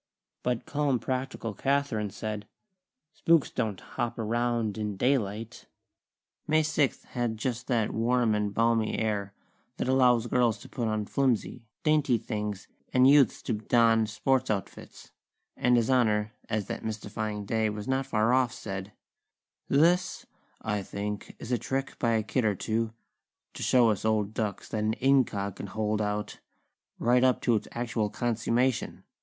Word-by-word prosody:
But 125 Hz, -2 st, -1 dB
calm, 145 Hz, -3 st, +1 dB
practical 130 Hz, -3 st, -3 dB
Kathlyn 135 Hz, -4 st, 0 dB
said: 105 Hz, 0 st, -5 dB, 0.7 s
"Spooks 165 Hz, -3 st, +3 dB
don't 110 Hz, -6 st, -2 dB
hop 120 Hz, -2 st, -4 dB
around 115 Hz, -1 st, 0 dB
in 105 Hz, -2 st, -3 dB
daylight." 115 Hz, -2 st, -1 dB, 0.8 s
May 155 Hz, 0 st, +3 dB
sixth 150 Hz, -3 st, 0 dB
had 120 Hz, -3 st, -2 dB
just 120 Hz, +1 st, -3 dB
that 115 Hz, -5 st, +1 dB
warm 120 Hz, 0 st, +2 dB
and 105 Hz, -1 st, 0 dB
balmy 115 Hz, +1 st, +1 dB
air 100 Hz, -3 st, -2 dB, 0.4 s
that -, -, -2 dB
allows 125 Hz, -3 st, +4 dB
girls 120 Hz, -2 st, +2 dB
to -, -, -12 dB
put 120 Hz, -3 st, -2 dB
on 110 Hz, -1 st, -1 dB
flimsy, 125 Hz, -2 st, -1 dB, 0.2 s
dainty 150 Hz, -5 st, +3 dB
things, 105 Hz, -3 st, -4 dB, 0.2 s
and 130 Hz, 0 st, +5 dB
youths 140 Hz, -1 st, +5 dB
to 120 Hz, -, -1 dB
don 115 Hz, 0 st, +3 dB
sports 120 Hz, +5 st, 0 dB
outfits; 100 Hz, -3 st, -5 dB, 0.4 s
and 125 Hz, 0 st, +3 dB
His 115 Hz, +2 st, +2 dB
Honor, 105 Hz, -4 st, +2 dB, 0.2 s
as 105 Hz, -3 st, -1 dB
that -, -, -5 dB
mystifying 105 Hz, -1 st, -4 dB
day 110 Hz, +1 st, +1 dB
was 105 Hz, 0 st, -6 dB
not 130 Hz, 0 st, 0 dB
far 110 Hz, +2 st, +2 dB
off, 130 Hz, -1 st, +3 dB
said: 95 Hz, -4 st, -6 dB, 0.7 s
"This, 175 Hz, +6 st, +2 dB, 0.4 s
I 105 Hz, -2 st, -1 dB
think, 100 Hz, +1 st, -5 dB
is 120 Hz, -, -8 dB
a 120 Hz, -, +2 dB
trick 135 Hz, 0 st, -3 dB
by 115 Hz, -1 st, +2 dB
a 110 Hz, -1 st, +1 dB
kid 120 Hz, +5 st, 0 dB
or 105 Hz, -2 st, +2 dB
two, 110 Hz, +3 st, -1 dB, 0.6 s
to -, -, -8 dB
show 120 Hz, -3 st, +4 dB
us 105 Hz, -2 st, -3 dB
old 110 Hz, -1 st, +1 dB
ducks 105 Hz, -4 st, -3 dB
that 105 Hz, -1 st, -2 dB
an 110 Hz, +1 st, +1 dB
'incog' 120 Hz, -8 st, +1 dB
can -, -, -6 dB
hold 110 Hz, +1 st, -1 dB
out, 105 Hz, 0 st, -3 dB, 0.6 s
right 125 Hz, +1 st, +3 dB
up 130 Hz, -1 st, +4 dB
to 120 Hz, -, +2 dB
its 110 Hz, -2 st, 0 dB
actual 115 Hz, -3 st, -1 dB
consummation. 120 Hz, +2 st, 0 dB
115 Hz, 155 wpm, -28 LUFS, 105-125 Hz, 0.8 s, and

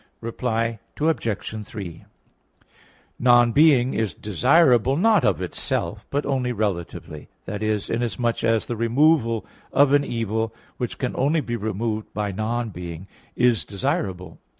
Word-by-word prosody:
Reply 115 Hz, -1 st, -2 dB, 0.2 s
Obj. 115 Hz, -, -1 dB
3: 95 Hz, -7 st, -8 dB, 1.2 s
Non 120 Hz, -1 st, +5 dB
being 135 Hz, -2 st, +5 dB
is 110 Hz, -8 st, -1 dB
desirable, 130 Hz, -, +3 dB
not 210 Hz, 0 st, +4 dB
of -, -, +1 dB
itself, -, -, -3 dB
but 145 Hz, +1 st, -1 dB
only 130 Hz, -3 st, 0 dB
relatively 90 Hz, -8 st, -4 dB, 0.2 s
i.e. 105 Hz, +1 st, -1 dB
inasmuch 120 Hz, 0 st, -1 dB
as 115 Hz, -1 st, +2 dB
the 120 Hz, -, -3 dB
removal 115 Hz, 0 st, +2 dB, 0.3 s
of 140 Hz, 0 st, +4 dB
an 145 Hz, 0 st, +5 dB
evil, 115 Hz, -2 st, -2 dB, 0.2 s
which 125 Hz, -, -4 dB
can 125 Hz, -, -3 dB
only 145 Hz, +5 st, +2 dB
be 120 Hz, -4 st, -3 dB
removed 110 Hz, 0 st, -3 dB
by 105 Hz, -1 st, -1 dB
non 115 Hz, +4 st, -2 dB
being, 85 Hz, -1 st, -7 dB, 0.3 s
is 120 Hz, -8 st, +3 dB
desirable. 95 Hz, -, -3 dB
115 Hz, 125 wpm, -23 LUFS, 105-130 Hz, 1.2 s, Non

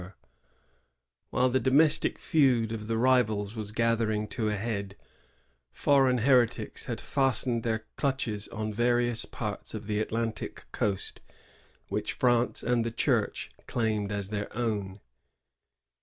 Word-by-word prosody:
15 90 Hz, +2 st, -10 dB, 1.2 s
While 130 Hz, +1 st, +2 dB
the 130 Hz, -, +3 dB
domestic 140 Hz, +5 st, +3 dB
feud 125 Hz, -7 st, +2 dB
of 110 Hz, -1 st, -5 dB
the 115 Hz, 0 st, 0 dB
rivals 110 Hz, -4 st, +2 dB
was 105 Hz, -2 st, -5 dB
gather 115 Hz, 0 st, +1 dB
ing 105 Hz, 0 st, -1 dB
to 110 Hz, -3 st, -1 dB
a 105 Hz, -, 0 dB
head, 100 Hz, -2 st, -3 dB, 0.8 s
foreign 135 Hz, -, +3 dB
heretics 125 Hz, -1 st, +2 dB
had -, -, -3 dB
fastened 130 Hz, -3 st, 0 dB
their 110 Hz, -1 st, -2 dB
clutches 125 Hz, -7 st, -1 dB
on 110 Hz, -1 st, -4 dB
various 120 Hz, +1 st, +1 dB
parts 105 Hz, -1 st, -5 dB
of 110 Hz, 0 st, -6 dB
the 105 Hz, 0 st, -1 dB
Atlantic 115 Hz, +1 st, -3 dB
coast 100 Hz, -2 st, -2 dB, 0.7 s
which -, -, -2 dB
France 120 Hz, -1 st, +2 dB
and 120 Hz, -1 st, +2 dB
the 115 Hz, -, -1 dB
Church 115 Hz, -, 0 dB, 0.2 s
claimed 110 Hz, -3 st, -1 dB
as 100 Hz, -1 st, -2 dB
their 105 Hz, -1 st, -3 dB
own. 105 Hz, -5 st, -2 dB
115 Hz, 135 wpm, -29 LUFS, 105-125 Hz, 1.2 s, the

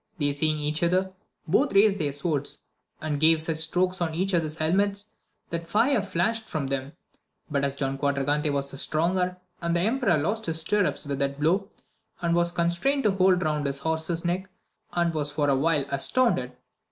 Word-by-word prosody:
They 145 Hz, -3 st, 0 dB
seeing 155 Hz, +2 st, 0 dB
each 150 Hz, +1 st, -2 dB
other, 185 Hz, +2 st, +1 dB, 0.3 s
both 255 Hz, -, +2 dB
raised 200 Hz, 0 st, +5 dB
their 145 Hz, -3 st, +1 dB
swords, 145 Hz, 0 st, -2 dB, 0.4 s
and 150 Hz, -2 st, -2 dB
gave 160 Hz, +1 st, +5 dB
such 160 Hz, 0 st, -2 dB
strokes 180 Hz, +3 st, +1 dB
on 160 Hz, -2 st, -1 dB
each 190 Hz, +3 st, -1 dB
other's 160 Hz, -3 st, +1 dB
helmet, 200 Hz, +6 st, +1 dB, 0.5 s
that 170 Hz, 0 st, -3 dB
fire 225 Hz, +6 st, +3 dB
flashed 215 Hz, +4 st, -1 dB
from 150 Hz, -3 st, -2 dB
them; 135 Hz, +1 st, -3 dB, 0.6 s
but 140 Hz, -1 st, 0 dB
as 140 Hz, -1 st, -1 dB
Don 135 Hz, -1 st, -2 dB
Quadragante 145 Hz, +2 st, 0 dB
was 140 Hz, -1 st, -2 dB
the 135 Hz, -, -6 dB
stronger, 180 Hz, +4 st, 0 dB, 0.2 s
the 170 Hz, 0 st, 0 dB
emperor 225 Hz, -2 st, +2 dB
lost 205 Hz, +9 st, -2 dB
his 165 Hz, 0 st, +1 dB
stirrups 190 Hz, +1 st, +1 dB
with 140 Hz, -1 st, -3 dB
that 140 Hz, 0 st, -1 dB
blow, 185 Hz, +7 st, +1 dB, 0.5 s
and 170 Hz, -1 st, 0 dB
was 170 Hz, 0 st, +2 dB
constrained 175 Hz, +12 st, +1 dB
to 210 Hz, -, +3 dB
hold 185 Hz, -1 st, +3 dB
round 150 Hz, -2 st, 0 dB
his 140 Hz, 0 st, -2 dB
horse's 160 Hz, +3 st, -1 dB
neck, 185 Hz, +2 st, -2 dB, 0.4 s
and 170 Hz, -1 st, +1 dB
was 150 Hz, -2 st, -1 dB
for 145 Hz, -1 st, 0 dB
a 140 Hz, -, +3 dB
while 150 Hz, 0 st, +1 dB
as 140 Hz, -1 st, +3 dB
tounded. 255 Hz, -2 st, +1 dB
165 Hz, 185 wpm, -26 LUFS, 145-185 Hz, 0.6 s, raised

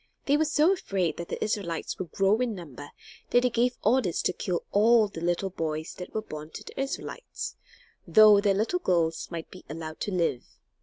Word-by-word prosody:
They 280 Hz, -, +3 dB
were 315 Hz, +1 st, +3 dB
so 310 Hz, +4 st, +4 dB
afraid 190 Hz, -, -1 dB
that 170 Hz, -, -6 dB
the -, -, -3 dB
Israelites 195 Hz, -6 st, -3 dB
would 180 Hz, -, -4 dB
grow 195 Hz, +3 st, +2 dB
in 245 Hz, -4 st, 0 dB
number 145 Hz, -6 st, -9 dB, 0.4 s
that 245 Hz, -, +4 dB
they 250 Hz, -, +2 dB
gave 245 Hz, +2 st, +1 dB
orders 215 Hz, -6 st, +2 dB
to 185 Hz, -, +1 dB
kill 180 Hz, -1 st, -2 dB
all 220 Hz, +1 st, +5 dB
the 165 Hz, -5 st, -8 dB
little 175 Hz, +3 st, 0 dB
boys 160 Hz, -2 st, -3 dB
that 180 Hz, -, -7 dB
were 220 Hz, -, -3 dB
born 155 Hz, -5 st, -8 dB
to -, -, -7 dB
the -, -, -10 dB
Israelites; 275 Hz, -, -5 dB, 0.5 s
though 215 Hz, -2 st, +7 dB
their 200 Hz, -2 st, +2 dB
little 225 Hz, -, 0 dB
girls 165 Hz, -, 0 dB
might 165 Hz, -2 st, -6 dB
be 185 Hz, -, -12 dB
allowed 155 Hz, +1 st, -6 dB
to 205 Hz, -, -3 dB
live. 170 Hz, -9 st, 0 dB
195 Hz, 200 wpm, -27 LUFS, 165-230 Hz, 0.5 s, though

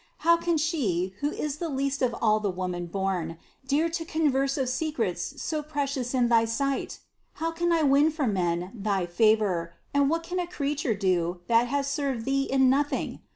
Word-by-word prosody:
How 335 Hz, 0 st, +7 dB
can 335 Hz, -1 st, 0 dB
she, 220 Hz, -, 0 dB
who 290 Hz, -, 0 dB
is 300 Hz, -1 st, -3 dB
the 335 Hz, +1 st, -3 dB
least 275 Hz, 0 st, -1 dB
of 245 Hz, -2 st, +1 dB
all 215 Hz, -1 st, +3 dB
the 205 Hz, -2 st, -1 dB
womanborn, 180 Hz, -1 st, -3 dB, 0.3 s
dare 295 Hz, +5 st, +2 dB
to 330 Hz, 0 st, -3 dB
converse 280 Hz, -4 st, +1 dB
of 265 Hz, -2 st, 0 dB
secrets 245 Hz, -, -2 dB
so 310 Hz, -2 st, -2 dB
precious 280 Hz, -4 st, -2 dB
in 245 Hz, -2 st, +3 dB
thy 230 Hz, -1 st, +4 dB
sight? 270 Hz, +5 st, -2 dB, 0.4 s
How 330 Hz, +1 st, -2 dB
can 345 Hz, +1 st, 0 dB
I 330 Hz, -2 st, +3 dB
win 285 Hz, +2 st, +5 dB
for 310 Hz, -3 st, -2 dB
men 180 Hz, -4 st, 0 dB
thy 200 Hz, -4 st, -1 dB
favor, 185 Hz, -3 st, +2 dB, 0.2 s
and 280 Hz, -1 st, +3 dB
what 330 Hz, +1 st, 0 dB
can 360 Hz, +2 st, -3 dB
a 355 Hz, -, -2 dB
creature 285 Hz, -7 st, -1 dB
do, 180 Hz, -3 st, 0 dB
that 235 Hz, +3 st, +3 dB
has 280 Hz, +2 st, 0 dB
served 275 Hz, -4 st, -2 dB
Thee 275 Hz, 0 st, +1 dB
in 265 Hz, -1 st, +4 dB
nothing? 285 Hz, +3 st, 0 dB
265 Hz, 185 wpm, -27 LUFS, 200-300 Hz, 0.4 s, How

